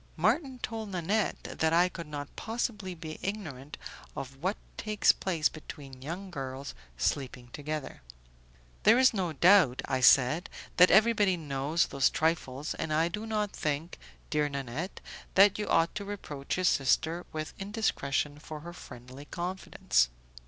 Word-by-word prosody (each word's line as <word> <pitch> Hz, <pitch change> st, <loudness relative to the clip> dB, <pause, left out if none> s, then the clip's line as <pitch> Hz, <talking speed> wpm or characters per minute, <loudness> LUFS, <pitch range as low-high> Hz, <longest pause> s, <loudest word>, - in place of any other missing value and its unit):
Marton 255 Hz, -, +1 dB
told 220 Hz, -1 st, -4 dB
Nanette 195 Hz, +3 st, -1 dB, 0.2 s
that 160 Hz, 0 st, +2 dB
I 175 Hz, +2 st, +5 dB
could 170 Hz, -3 st, -8 dB
not 145 Hz, -1 st, -7 dB
possibly 220 Hz, -4 st, -3 dB
be 160 Hz, -2 st, -8 dB
ignorant 155 Hz, -9 st, -5 dB, 0.4 s
of 135 Hz, 0 st, -6 dB
what 190 Hz, +5 st, 0 dB, 0.2 s
takes 215 Hz, -1 st, +3 dB
place 170 Hz, -5 st, 0 dB
between 140 Hz, -4 st, -10 dB
young 180 Hz, +7 st, -6 dB
girls 135 Hz, -2 st, -5 dB, 0.2 s
sleeping 125 Hz, -, -2 dB
together. 150 Hz, 0 st, -5 dB, 0.8 s
"There 220 Hz, +3 st, +6 dB
is 260 Hz, -1 st, +5 dB
no 185 Hz, -5 st, -1 dB
doubt," 170 Hz, -4 st, +5 dB
I 130 Hz, -, 0 dB
said, 135 Hz, +6 st, +5 dB, 0.3 s
"that 180 Hz, +1 st, +8 dB
everybody 210 Hz, -3 st, +4 dB
knows 145 Hz, +1 st, 0 dB
those 135 Hz, -1 st, +2 dB
trifles, 155 Hz, -3 st, -1 dB
and 155 Hz, -, -4 dB
I 160 Hz, +2 st, +2 dB
do 210 Hz, +6 st, -5 dB
not 210 Hz, -2 st, -1 dB
think, 150 Hz, +3 st, -3 dB, 0.3 s
dear 150 Hz, -1 st, +2 dB
Nanette, 140 Hz, +6 st, -5 dB, 0.3 s
that 200 Hz, +1 st, +6 dB
you 210 Hz, -, -2 dB
ought 165 Hz, +1 st, +3 dB
to 210 Hz, -, -4 dB
reproach 180 Hz, -9 st, -5 dB
your 185 Hz, -, -1 dB
sister 160 Hz, +3 st, +2 dB
with 155 Hz, 0 st, -5 dB
indiscretion 150 Hz, -9 st, -1 dB
for 155 Hz, 0 st, -8 dB
her 170 Hz, +2 st, -8 dB
friendly 130 Hz, -3 st, -11 dB
confidence." 175 Hz, -, 0 dB
165 Hz, 145 wpm, -30 LUFS, 140-195 Hz, 0.8 s, that